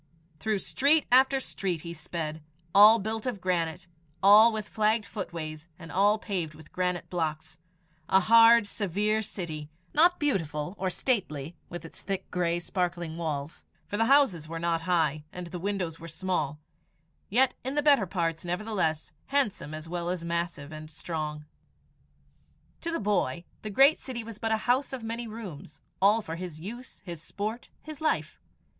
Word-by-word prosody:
Through 215 Hz, +5 st, 0 dB
street 285 Hz, +9 st, +2 dB
after 265 Hz, +2 st, +5 dB
street 185 Hz, -9 st, -3 dB
he 170 Hz, +1 st, -6 dB
sped 155 Hz, -1 st, -5 dB, 0.3 s
all 210 Hz, +3 st, +9 dB
built 220 Hz, +2 st, -3 dB
of 240 Hz, -5 st, -2 dB
granite, 180 Hz, -1 st, -1 dB, 0.4 s
all 210 Hz, +4 st, +8 dB
with 215 Hz, -1 st, -4 dB
flagged 215 Hz, 0 st, +1 dB
footways, 165 Hz, -6 st, -6 dB
and 165 Hz, -3 st, -10 dB
all 205 Hz, +6 st, +4 dB
paved 180 Hz, -8 st, -3 dB
with 155 Hz, 0 st, -15 dB
granite 180 Hz, -1 st, -1 dB
blocks 160 Hz, -2 st, -3 dB, 0.5 s
a 190 Hz, -, +5 dB
hard, 230 Hz, +2 st, +7 dB
severe 205 Hz, +2 st, 0 dB
city, 160 Hz, -8 st, -6 dB, 0.2 s
not 345 Hz, +4 st, +5 dB
beautiful 165 Hz, -, -1 dB
or 190 Hz, -, 0 dB
stately 175 Hz, -, -1 dB
with 175 Hz, -1 st, -7 dB
its 165 Hz, -, -9 dB
thick, 195 Hz, -1 st, -4 dB
grey, 175 Hz, -1 st, +1 dB
sparkling 175 Hz, -2 st, -2 dB
walls, 155 Hz, -3 st, -4 dB, 0.2 s
for -, -, -5 dB
the 225 Hz, +2 st, +2 dB
houses 235 Hz, -, +4 dB
were 165 Hz, +1 st, -5 dB
not 165 Hz, 0 st, 0 dB
high, 155 Hz, -4 st, +2 dB
and 180 Hz, 0 st, -6 dB
the 180 Hz, -, -5 dB
windows 185 Hz, -4 st, -2 dB
were 165 Hz, -, -8 dB
small, 160 Hz, -4 st, -2 dB, 0.7 s
yet 255 Hz, +4 st, +4 dB
in 265 Hz, +3 st, -3 dB
the 295 Hz, -, +2 dB
better 280 Hz, -10 st, +5 dB
parts, 165 Hz, -2 st, -1 dB
nevertheless, 175 Hz, -3 st, -1 dB, 0.2 s
handsome 265 Hz, -, 0 dB
as 155 Hz, +1 st, -7 dB
well 175 Hz, 0 st, -3 dB
as 180 Hz, -2 st, -2 dB
massive 170 Hz, -3 st, -3 dB
and 155 Hz, 0 st, -8 dB
strong. 155 Hz, -2 st, -5 dB, 1.4 s
To 335 Hz, -, -3 dB
the 330 Hz, -, -1 dB
boy 180 Hz, -7 st, 0 dB, 0.2 s
the 215 Hz, -, -5 dB
great 270 Hz, +9 st, +5 dB
city 245 Hz, -3 st, -5 dB
was 220 Hz, -2 st, -9 dB
but 225 Hz, -, -1 dB
a 220 Hz, -, +3 dB
house 260 Hz, +3 st, +2 dB
of 255 Hz, -3 st, -5 dB
many 230 Hz, +1 st, -4 dB
rooms, 195 Hz, -9 st, -9 dB, 0.2 s
all 210 Hz, +3 st, +5 dB
for 165 Hz, -2 st, -5 dB
his 175 Hz, -3 st, -7 dB
use, 235 Hz, +9 st, -9 dB
his 170 Hz, -4 st, -7 dB
sport, 210 Hz, +8 st, -5 dB
his 310 Hz, -1 st, -9 dB
life. 310 Hz, -, 0 dB
185 Hz, 165 wpm, -28 LUFS, 165-220 Hz, 1.4 s, all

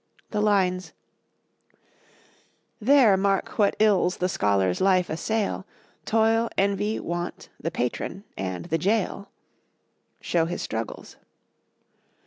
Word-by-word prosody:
The 210 Hz, -, 0 dB
lines, 190 Hz, -3 st, +1 dB, 1.9 s
"There 240 Hz, -3 st, +5 dB
mark 195 Hz, +1 st, 0 dB
what 205 Hz, -1 st, +3 dB
ills 195 Hz, -4 st, +3 dB
the 180 Hz, -, 0 dB
scholar's 100 Hz, -, +1 dB
life 185 Hz, -3 st, +3 dB
assail, 205 Hz, +4 st, -2 dB, 0.4 s
Toil, 225 Hz, +1 st, +2 dB
envy, 200 Hz, +2 st, +1 dB
want, 175 Hz, +1 st, -5 dB
the 165 Hz, -, -2 dB
patron, 165 Hz, +6 st, -3 dB
and 95 Hz, -3 st, -4 dB
the 165 Hz, -, -1 dB
jail," 200 Hz, +1 st, -1 dB, 0.9 s
show 165 Hz, -2 st, +1 dB
his 175 Hz, +1 st, -4 dB
struggles. 110 Hz, 0 st, -6 dB
190 Hz, 105 wpm, -25 LUFS, 165-210 Hz, 1.9 s, There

